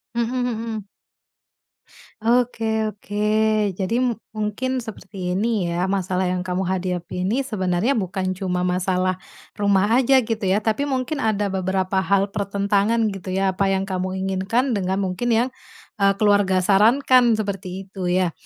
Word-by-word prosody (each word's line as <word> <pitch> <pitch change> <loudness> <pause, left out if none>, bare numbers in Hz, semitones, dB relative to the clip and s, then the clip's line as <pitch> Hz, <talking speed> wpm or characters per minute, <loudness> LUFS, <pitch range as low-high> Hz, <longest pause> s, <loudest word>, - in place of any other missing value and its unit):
Hmm, 235 - +2 0.2
mhm. 225 -3 -4 1.4
Oke 225 -2 +1
oke. 205 0 -4 0.5
Jadi 200 +6 -1 0.3
mungkin 220 +5 -2
seperti 195 -5 -5
ini 210 -3 0
ya 170 +1 -1
masalah 190 -1 0
yang 180 0 -3
kamu 180 +1 -1
hadapi 180 -1 -2
ini 255 +7 +1
sebenarnya 190 0 0
bukan 190 -5 -1
cuma 185 -1 -2
masalah 185 0 0 0.4
rumah 200 +1 +3
aja 265 0 +4
gitu 220 -3 -2
ya, 200 +3 +2
tapi 225 +7 0
mungkin 265 +2 -2
ada 210 -4 0
beberapa 190 0 0
hal 195 +1 +1
pertentangan 200 +2 +1
gitu 185 -1 -5
ya, 195 0 +2
apa 195 +1 0
yang 195 0 +1
kamu 185 -1 -3
inginkan 195 +8 0
dengan 195 -2 0
mungkin 190 +6 -2
yang, 235 +1 +3 0.5
eee, 195 0 +4
keluarga 205 -3 +3
sarankan, 235 +4 +4
seperti 195 -3 -4
itu 190 -1 -5
ya? 180 -2 +2
200 Hz, 140 wpm, -22 LUFS, 185-220 Hz, 1.4 s, aja